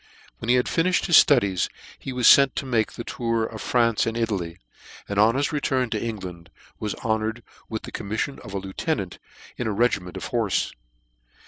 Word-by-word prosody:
When 115 - -5
he 125 - +6
hacj 125 - +3 0.2
finifhed 180 +1 +1
his 175 - +8
ftudies 100 - +2 0.3
he 135 - -6
was 125 -2 -1
fent 140 -1 +4
to - - -3
make 115 -4 0
the 120 - -6
tour 115 -1 -1
of 110 -1 -7
France 115 -3 +2
and 115 0 -2
Italy, 95 -8 -2 0.5
and 100 0 -1
on 110 +3 +5
his 140 +3 0
return 130 -5 0
to 110 - -1
England 90 -7 -6 0.3
was 105 -1 -3
honoured 110 +1 -1 0.3
with 110 -1 -4
the - - -8
commiffion 110 +7 -3
of 100 -4 -9
a - - 0
lieute 95 0 -2
nant - - -6 0.4
in 120 - -2
a - - 0
regiment 100 -5 0
of - - -6
horfe. 115 -5 0
115 Hz, 195 wpm, -24 LUFS, 100-125 Hz, 0.5 s, his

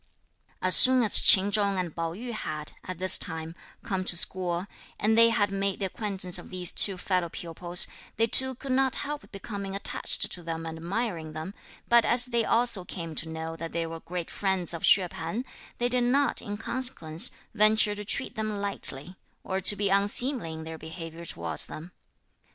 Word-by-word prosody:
As 185 0 +7
soon 255 -1 +7
as 215 - +7
Ch'in 195 +1 +6
Chung 200 -2 0
and 175 -4 -4
Pao 165 0 -3
yü 240 +4 -7
had, 155 -9 -5
at 185 -1 -6
this 185 +1 +2
time, 160 0 -4 0.3
come 195 -6 -3
to 175 - +1
school, 180 0 +1 0.3
and 220 +2 +2
they 230 0 +6
had 205 -3 0
made 195 -1 -1
the 200 - -3
acquaintance 190 -2 -2
of - - -12
these 180 -2 -1
two 195 -2 +3
fellow 180 -2 -1
pupils, 175 +1 +1 0.3
they 225 - +3
too 260 +3 +2
could 265 +2 -7
not 265 0 +1
help 295 0 -7
becoming 200 -1 -7
attached 200 - +1
to 180 - -6
them 165 -1 -6
and 160 0 -7
admiring 170 -3 -4
them, 155 +5 -7 0.3
but 235 -1 +5
as 240 0 +3
they 235 -2 0
also 230 -4 0
came 170 -2 -7
to 160 +1 -2
know 160 0 -6
that 165 0 -7
they 170 0 -2
were 165 0 -7
great 175 0 -6
friends 190 -4 -2
of 165 - -6
Hsüeh 185 -3 +4
P'an, 170 +10 -5 0.3
they 240 - +1
did 245 0 +1
not, 280 +3 +1
in 205 0 -6
consequence, 220 -10 -2 0.2
venture 215 0 +4
to 205 0 -7
treat 205 - -1
them 215 -1 -4
lightly, 185 -4 -3 0.3
or 190 0 -3
to 195 +2 +5
be 200 -1 -1
unseemly 205 - +4
in 160 0 -8
their 160 0 -8
behaviour 165 +1 -9
towards 85 - -3
them. 165 +3 -10
190 Hz, 190 wpm, -27 LUFS, 165-220 Hz, 0.3 s, As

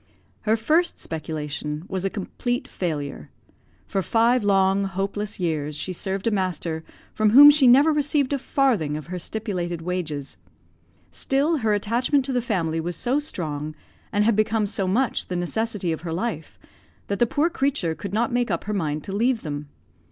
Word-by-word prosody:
Her 220 +1 +2
first 320 +10 +1
speculation 150 0 -4
was 190 -1 -3
a 195 - +1
complete 245 +6 -3
failure. 145 - -4 0.6
For 195 - -1
five 230 +4 +2
long, 195 0 +3
hopeless 195 +2 -3
years 155 -4 -1
she 185 +5 -4
served 190 +2 -3
a 230 - +2
master 180 -5 -2 0.3
from 215 -1 +3
whom 285 +6 +10
she 285 -3 +4
never 280 +6 +6
received 290 -2 +1
a 280 - 0
farthing 230 - +1
of 155 - -7
her 180 - -3
stipulated 175 -4 -3
wages. 160 - -4 0.7
Still 275 - +1
her 220 -5 +1
attachment 245 +6 +1
to 270 - -2
the 250 - +1
family 170 -9 -1
was 175 +1 -3
so 255 +4 +1
strong, 155 - -4 0.4
and 205 -1 +2
had 230 -1 +3
become 215 0 +2
so 195 -1 -2
much 235 +6 0
the 180 - -3
necessity 190 +1 -1
of 160 - -3
her 170 -1 -5
life, 190 +9 -4 0.5
that 200 - -3
the 240 - +4
poor 305 +8 +1
creature 270 - 0
could 195 +4 -7
not 230 +3 0
make 245 -1 +1
up 170 -3 -1
her 210 - -3
mind 155 -6 -2
to 195 - -5
leave 235 +2 +1
them. 145 -2 -5
200 Hz, 175 wpm, -24 LUFS, 165-240 Hz, 0.7 s, whom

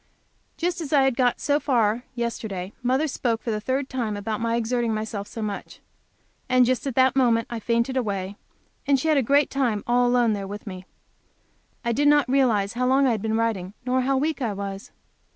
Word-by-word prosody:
Just 350 +1 -1
as 300 - -6
I 285 -3 +5
had 265 -2 +2
got 250 -1 +2
so 290 0 +1
far, 240 -4 +1
yesterday, 220 -5 -4
mother 260 +5 +1
spoke 240 -5 -2
for 235 - -2
the 210 -1 -2
third 260 +4 -1
time 230 -6 -3
about 215 +2 -3
my 230 0 0
exerting 235 -1 0
myself 215 -2 -4
so 225 - -6
much. 205 -2 -6 0.7
And 255 -1 +5
just 255 +2 0
at 265 - -3
that 260 0 +4
moment 235 -4 +3
I 235 - -3
fainted 235 +3 0
away, 200 -5 -2 0.5
and 280 -1 +4
she 320 - -1
had 305 - +4
a - - +4
great 280 +4 +2
time 240 -7 0
all 245 +1 +3
alone 245 -2 +3
there 200 -1 -4
with 205 +2 -8
me. 185 -3 -8 1.0
I 235 - +1
did 290 +5 +2
not 290 -3 +4
realize 240 -6 +2
how 250 +1 0
long 270 +2 +4
I 260 - +3
had 220 -3 -1
been 220 +1 0
writing, 210 -4 -2
nor 255 +1 +1
how 270 +1 +1
weak 300 +1 -1
I 225 -4 -1
was. 195 0 -6
240 Hz, 210 wpm, -24 LUFS, 215-265 Hz, 1.0 s, I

